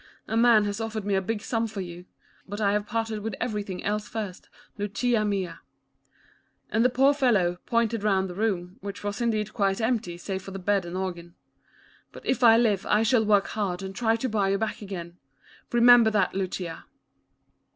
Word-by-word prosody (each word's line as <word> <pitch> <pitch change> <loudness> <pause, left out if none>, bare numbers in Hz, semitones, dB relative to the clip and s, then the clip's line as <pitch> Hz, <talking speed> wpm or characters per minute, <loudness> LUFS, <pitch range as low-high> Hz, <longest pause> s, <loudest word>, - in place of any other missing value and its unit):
A 220 - -2
man 230 -2 +5
has 205 +2 -3
offered 220 -2 -4
me 205 - 0
a 190 - +2
big 210 +2 -3
sum 230 -1 -1
for 215 -2 -7
you. 175 0 -8 0.4
But 205 +2 -6
I 200 -2 +2
have 210 0 -1
parted 225 -2 -2
with 210 -1 -4
everything 210 -6 -3
else 210 +1 -1
first, 210 -5 -6 0.3
Lucia 215 +3 0
mia," 200 -3 -2 1.1
and 225 - +2
the 250 - +5
poor 270 +3 +4
fellow, 210 -11 +2
pointed 230 -2 +1
round 195 -2 +1
the 180 - -7
room, 185 -3 -2
which 200 +1 -7
was 205 +2 -3
indeed 215 -3 0
quite 195 -2 +1
empty, 225 -6 -1
save 190 +2 -4
for 195 - -10
the 195 - -6
bed 195 0 0
and 175 +2 -5
organ. 175 -2 -5 0.4
" - - -31
But, - - -12
if 255 -1 0
I 225 -1 +8
live, 210 -5 +2
I 210 +1 +3
shall 225 0 +3
work 205 -2 +3
hard 195 -3 -2
and 190 0 -6
try 225 0 +2
to 230 +3 -2
buy 210 -4 +1
you 195 - +2
back 220 +1 -3
again. 175 -4 -7 0.5
Remember 240 -1 +7
that, 205 -3 +1
Lucia." 185 -3 -4
210 Hz, 195 wpm, -26 LUFS, 190-225 Hz, 1.1 s, I